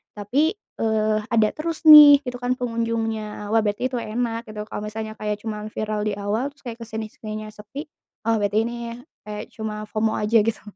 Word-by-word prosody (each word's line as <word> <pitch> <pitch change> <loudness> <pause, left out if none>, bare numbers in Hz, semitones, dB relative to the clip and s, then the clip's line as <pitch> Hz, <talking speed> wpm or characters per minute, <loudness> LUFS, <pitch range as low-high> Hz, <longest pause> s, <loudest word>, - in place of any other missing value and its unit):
tapi, 270 - +1 0.2
eee, 220 -1 +1 0.2
ada 225 -2 +3
terus 325 +1 -4
nih, 290 -1 +11
itu 250 -2 -5
kan 250 +1 +1
pengunjungnya, 225 -3 -3
wah 225 - +4
berarti 205 +3 -1
itu 250 - -1
enak 230 +1 -3
gitu. 210 -1 -6
Kalau 210 - -6
misalnya 220 +1 -5
kayak 210 0 -3
cuma 215 -1 -4
viral 215 0 -2
di 205 - -1
awal 205 +4 -1
terus 285 - -26
kayak 240 -2 -7
kesini-sininya 215 -1 -6
sepi, 210 +7 -8 0.4
wah 225 0 +2
berarti 205 0 0
ini 235 +1 -4 0.5
kayak 210 0 -5
cuma 215 -1 -5
FOMO 220 0 0
aja 215 +2 +3
gitu. 225 +1 0
220 Hz, 180 wpm, -23 LUFS, 210-235 Hz, 0.5 s, nih